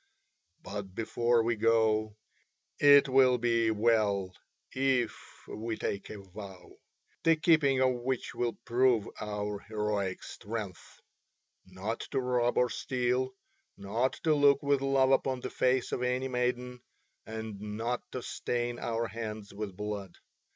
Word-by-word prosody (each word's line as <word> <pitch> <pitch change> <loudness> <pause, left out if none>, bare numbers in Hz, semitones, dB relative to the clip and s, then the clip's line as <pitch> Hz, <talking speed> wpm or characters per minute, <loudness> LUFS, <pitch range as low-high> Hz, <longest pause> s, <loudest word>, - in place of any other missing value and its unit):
But 100 -2 -6
before 115 +1 +1
we 115 +1 +1
go, 110 -1 +2 0.6
it 145 0 +7
will 130 -1 +5
be 115 -1 +2
well 105 -4 +2 0.4
if 130 -3 +1 0.3
we 110 +1 -4
take 100 0 -3
a 110 - -7
vow 95 -1 -11 0.4
the 165 0 +5
keeping 155 -5 +3
of 130 -1 +4
which 130 0 -2
will 120 -1 -2
prove 120 -3 +3
our 105 -1 -3
heroic 105 -3 -2
strength 100 -7 -7 0.7
not 95 +5 -4
to 135 - 0
rob 125 -1 +1
or 125 -1 +3
steal, 130 +2 -1 0.4
not 110 +6 0
to 160 - +4
look 145 -1 +4
with 140 -1 +2
love 135 -1 +3
upon 135 -1 +1
the - - -5
face 130 0 +1
of - - -2
any 125 +1 0
maiden, 125 0 -2 0.5
and 110 -2 -6
not 115 +4 -3
to 130 - -4
stain 120 0 -2
our 115 0 -1
hands 110 -1 -6
with 100 -2 -6
blood. 105 -3 -5
115 Hz, 135 wpm, -30 LUFS, 105-130 Hz, 0.7 s, it